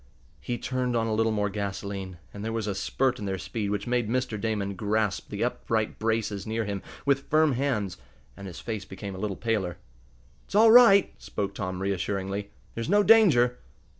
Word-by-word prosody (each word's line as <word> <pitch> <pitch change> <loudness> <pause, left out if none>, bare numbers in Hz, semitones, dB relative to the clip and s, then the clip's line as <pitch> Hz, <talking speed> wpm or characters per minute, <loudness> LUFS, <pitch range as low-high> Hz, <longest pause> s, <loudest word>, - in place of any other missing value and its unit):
He 120 - -3
turned 125 0 -2
on 115 -1 +1
a 110 - -1
little 110 +1 +2
more 105 -2 0
gasoline, 100 -2 -4 0.2
and 100 - -7
there 110 - -2
was 115 -1 -2
a 105 - -1
spurt 130 +6 0
in 105 - -5
their 95 -1 -2
speed 105 +2 -4
which 100 0 -2
made 120 -3 0
Mr. 120 -4 -1
Damon 105 -3 -1
grasp 105 +1 -1
the - - -2
upright - - -1
braces 110 -2 -1
near 110 0 -1
him 100 -1 -3 0.2
with 140 -1 +1
firm 155 0 +4
hands, 120 -8 -1 0.4
and 100 0 -9
his 90 -1 -8
face 110 -4 -4
became 95 +1 -7
a 95 - -7
little 100 -2 -3
paler. 105 -7 -1 0.7
"It's - - -9
all 220 +1 +7
right," 225 -5 +7
spoke 100 -1 -3
Tom, 95 -1 -4
reassuringly. 100 +1 -2 0.2
"There's 115 +5 -4
no 205 +2 +5
danger." 150 - +5
110 Hz, 190 wpm, -27 LUFS, 100-125 Hz, 0.7 s, all